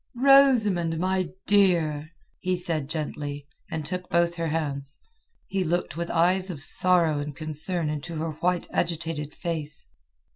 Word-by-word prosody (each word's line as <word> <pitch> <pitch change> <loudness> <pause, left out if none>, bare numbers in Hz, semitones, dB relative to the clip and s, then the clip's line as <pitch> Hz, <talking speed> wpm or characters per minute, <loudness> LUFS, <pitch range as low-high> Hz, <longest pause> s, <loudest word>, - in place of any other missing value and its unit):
"Rosamund, 240 -11 +5
my 185 0 0 0.2
dear!" 170 -7 +2 0.3
he 185 0 0
said 160 -5 -1
gently, 145 -2 -4 0.2
and 155 -2 -4
took 180 +3 -5
both 170 0 +2
her 165 -1 -3
hands. 145 -3 -3 0.5
He 195 -1 -1
looked 175 -3 -1
with 170 +1 -3
eyes 180 +3 +2
of 165 -6 -5
sorrow 170 -1 +3
and 145 -1 -5
concern 155 +3 0
into 150 +3 -4
her 160 +1 -2
white, 175 +3 -1
agitated 165 -3 -2
face. 155 -3 -4
165 Hz, 140 wpm, -26 LUFS, 150-180 Hz, 0.5 s, Rosamund